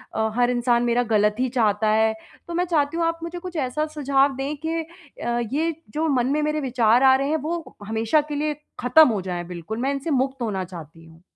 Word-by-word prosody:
अ, 220 0 +1
हर 245 0 +3
इंसान 240 0 +2
मेरा 240 +1 +2
गलत 210 0 +3
ही 255 -1 +1
चाहता 220 -3 +1
है। 220 +1 +3 0.3
तो 345 - -6
मैं 355 +1 +1
चाहती 295 0 +1
हूँ 335 - +1
आप 330 0 -1
मुझे 345 +1 -5
कुछ 360 -1 -8
ऐसा 305 +5 -1
सुझाव 275 -1 +2
दें 275 +3 -3
कि 330 +1 -1 0.4
अ, 240 0 0
ये 320 +1 0 0.2
जो 315 +2 0
मन 255 -3 +2
में 300 - +1
मेरे 305 0 0
विचार 245 -1 +3
आ 265 0 +7
रहे 275 +1 0
हैं 315 - +1
वो 335 0 -4
हमेशा 225 +7 +2
के 290 - -2
लिए 300 +1 0 0.3
ख़त्म 275 +6 +6
हो 210 -4 -1
जाए 180 -1 -4
बिल्कुल। 175 +6 -6
मैं 270 +2 +1
इनसे 280 +3 -3
मुक्त 265 -1 0
होना 200 -5 -1
चाहती 165 -2 -11
हूँ। 165 0 -18
260 Hz, 225 wpm, -23 LUFS, 220-300 Hz, 0.4 s, आ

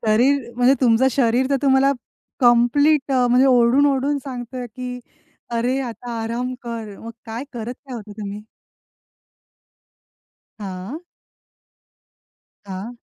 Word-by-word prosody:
शरीर 240 +3 +2
म्हणजे 250 +2 +5
तुमचं 250 +1 +4
शरीर 250 0 +2
तर 275 - +3
तुम्हाला 270 0 +4 0.5
कंप्लीट 265 +5 +4
अ, 250 -1 +3
म्हणजे 255 +2 +5
ओरडून 250 +2 +5
ओरडून 280 +1 +1
सांगतय 250 -1 -6
की 250 +2 -7 0.6
अरे 250 +3 0
आता 245 -1 -6
आराम 245 +3 -3
कर. 230 -3 -6
मग 230 - -8 0.2
काय 230 +4 -5
करत 240 +1 -5
काय 260 - -7
होता 210 -3 -8
तुम्ही? 205 0 -6 2.2
हां. 195 - -6 1.6
हां. 200 +5 -7
245 Hz, 115 wpm, -21 LUFS, 230-265 Hz, 2.2 s, म्हणजे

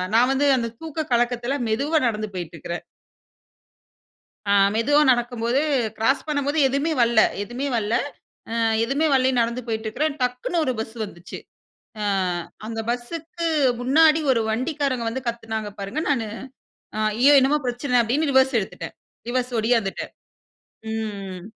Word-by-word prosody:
நான் 245 +3 +5
வந்து 285 +2 +2
அந்த 230 -1 -2
தூக்க 315 -1 -5
கலக்கத்தில 240 +3 +1
மெதுவா 290 +8 +1
நடந்து 215 -2 -2
போயிட்டுருக்கறேன். 170 0 -6 1.6
ஆ - - +3 0.2
மெதுவா 290 +7 +3
நடக்கும்போது 240 +1 0 0.4
கிராஸ் 265 +7 +1
பண்ணும்போது, 285 +1 0
எதுவுமே 280 +5 0
வல்ல 235 -2 +4 0.2
எதுவுமே 240 +6 -4
வல்ல 215 0 -1 0.6
அ - - -3 0.3
எதுவுமே 275 +7 0
வல்லைன்னு 260 -1 +3
நடந்து 235 +2 -1
போயிட்டு 220 0 -3
இருக்கிறேன் 290 +6 -1
டக்குனு 250 +7 -1
ஒரு 255 - +1
பஸ் 220 +1 -5
வந்துச்சு. 175 -3 -9 0.6
ஆ - - -2 0.6
அந்த 225 0 -4
பஸ்ஸுக்கு 330 +8 -4 0.3
முன்னாடி 310 +5 +4
ஒரு 230 - +1
வண்டிக்காரங்க 255 +1 -1
வந்து 255 +3 -4
கத்துனாங்க 225 -2 -4
பாருங்க, 200 +10 -3
நானு 235 -6 +1 0.9
ஐயோ! 280 +4 +6
என்னமோ 280 +3 +3
பிரச்சனை 245 +1 0
அப்டின்னு 280 +6 0
ரிவர்ஸ் 265 -1 +4
எடுத்துட்டேன். 195 - -6 0.3
ரிவர்ஸ் 250 0 -1
ஓடியாந்துட்டேன். 225 -3 0 0.8
ம். 200 -4 -5
245 Hz, 130 wpm, -23 LUFS, 225-280 Hz, 1.6 s, ஐயோ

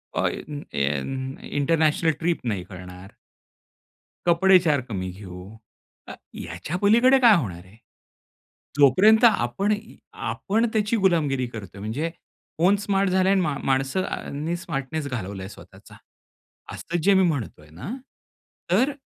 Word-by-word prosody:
अ, - - +1
N 145 -1 -6
N 75 - -2
international 160 +2 +2
trip 170 0 0
नाही 100 -5 -2
करणार. 90 0 -11 1.2
कपडे 185 +2 +6
4 150 -4 +2
कमी 95 -4 -4
घेऊ. 90 -1 -10 0.6
अ, - - -8 0.2
याच्या 90 - -5
पलीकडे 235 +7 +5
काय 235 -4 +7
होणार 90 - -4
आहे? 95 +4 -19 1.0
जोपर्यंत 205 - +6
आपण 200 - +3
ई 210 +1 -5 0.2
आपण 220 +4 -1
त्याची 215 +1 +1
गुलामगिरी 155 - +1
करतोय. 100 -4 -9
म्हणजे 130 +11 -3 0.5
फोन 185 +5 +4
स्मार्ट 195 -1 0
झालं 185 0 +2
आहे 195 - +4
आणि - - +3
म 145 - -2
माणसांनी 140 +3 -1
स्मार्टनेस 140 -2 -4
घालवला 100 -6 -5
आहे 95 - -7
स्वतःचा. - - -15 0.8
असं 175 +1 -4
जे 200 +4 +5
मी 190 - +5
म्हणतो 125 - -4
आहे 75 - -18
ना, 90 - -8 0.8
तर 250 +10 +3
150 Hz, 135 wpm, -24 LUFS, -, 1.2 s, काय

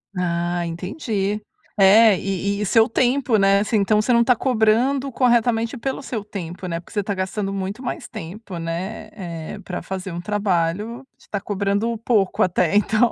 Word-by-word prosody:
Ah, 175 -1 -1
entendi, 200 - -3 0.4
é 205 +1 +7
e 200 +2 -2
e - - 0
seu 225 +3 +4
tempo, 250 -1 +2
né, 195 0 +4
assim 215 +2 +1
então 210 +1 +3
você 245 +3 +1
não 235 0 +5
tá 250 +1 +4
cobrando 255 +3 +2
corretamente 240 -1 +2
pelo 265 +3 -3
seu 230 -6 -4
tempo, 185 -3 -7
né, 170 -1 -2
porque 170 - -16
você 205 -2 0
tá 200 - -2
gastando 195 +1 -2
muito 195 +6 -4
mais 245 - -4
tempo, 185 +3 -8
né, 170 +6 -4
é 170 +1 -7
para 180 - -5
fazer 190 0 -5
um 170 +1 -5
trabalho 205 +3 -1
você - - -23
tá 205 - -3
cobrando 205 +3 -1
pouco 215 -3 +1
até 180 -2 +2
então, 215 +3 +3
205 Hz, 175 wpm, -22 LUFS, 185-230 Hz, 0.4 s, é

